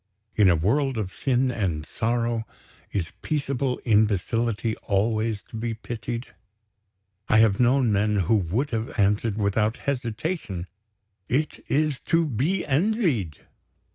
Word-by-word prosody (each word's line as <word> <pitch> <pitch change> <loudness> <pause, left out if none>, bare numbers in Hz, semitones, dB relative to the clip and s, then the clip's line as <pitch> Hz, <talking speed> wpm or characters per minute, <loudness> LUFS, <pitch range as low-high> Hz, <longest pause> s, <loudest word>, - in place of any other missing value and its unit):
In 105 -3 +5
a 90 - +5
world 130 - +1
of 100 -4 -3
sin 130 -1 +1
and 90 -10 -2
sorrow, 115 +5 -1 0.4
is 85 -5 -2
peaceable 140 -3 -1
imbecility 110 +1 +1
always 110 +1 0
to - - -10
be 115 0 -2
pitied? 120 +2 -6 1.0
I 110 - +5
have 110 -3 +4
known 125 -1 +4
men 105 +1 +2
who 95 +6 +2
would 105 - -1
have 115 +1 -3
answered, 105 +1 +2
without 105 +3 +1
hesitation: 120 - -2 0.6
"It 145 +5 -1
is 150 -2 +1
to 165 0 +3
be 150 - 0
envied." 145 - 0
115 Hz, 125 wpm, -25 LUFS, 105-135 Hz, 1.0 s, In